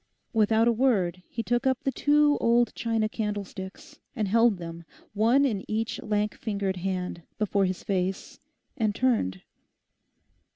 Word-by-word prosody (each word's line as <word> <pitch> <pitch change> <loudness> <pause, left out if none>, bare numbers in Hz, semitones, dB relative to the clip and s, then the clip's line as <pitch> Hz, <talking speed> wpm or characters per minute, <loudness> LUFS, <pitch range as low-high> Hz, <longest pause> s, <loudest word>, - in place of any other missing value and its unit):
Without 220 +1 +3
a - - +5
word 205 -8 +1
he 230 - -4
took 240 +3 0
up 260 -1 0
the 270 - +1
two 295 +1 +3
old 235 +1 +3
china 225 -2 0
candlesticks, 210 - -6 0.2
and 215 -5 -1
held 230 0 +4
them, 170 -1 -8 0.3
one 235 +7 +4
in 210 -8 -1
each 225 +1 -2
lank 210 0 0
fingered 200 -3 -3
hand, 180 -1 -3 0.2
before 200 -2 +1
his 185 0 -3
face, 190 -1 -2 0.4
and 215 -3 0
turned. 155 - 0
215 Hz, 140 wpm, -27 LUFS, 190-235 Hz, 0.4 s, a